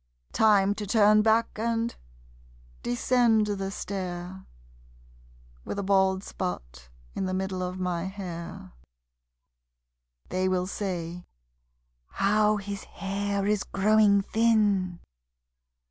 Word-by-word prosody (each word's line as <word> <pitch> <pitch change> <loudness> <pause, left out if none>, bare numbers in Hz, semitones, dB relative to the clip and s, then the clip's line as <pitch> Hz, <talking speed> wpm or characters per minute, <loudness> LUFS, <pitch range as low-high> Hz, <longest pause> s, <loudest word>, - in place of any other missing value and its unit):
Time 205 -2 +4
to 205 0 -6
turn 215 0 +5
back 220 0 +2
and 230 +1 -1 0.9
descend 225 - +2
the 195 -2 -3
stair, 185 -2 -6 1.2
With - - -5
a 200 - -2
bald 190 -1 +2
spot - - -6 0.2
in 190 - -2
the 185 - -2
middle 190 -1 -2
of 180 +1 -4
my 180 -1 -2
hair 185 -1 -7 1.6
(They 185 0 0
will 180 -1 0
say: 180 -3 -4 0.9
"How 210 +2 +3
his 200 0 -6
hair 200 0 -3
is 210 0 +1
growing 205 0 +3
thin!") 205 -6 +2
195 Hz, 100 wpm, -27 LUFS, 185-210 Hz, 1.6 s, turn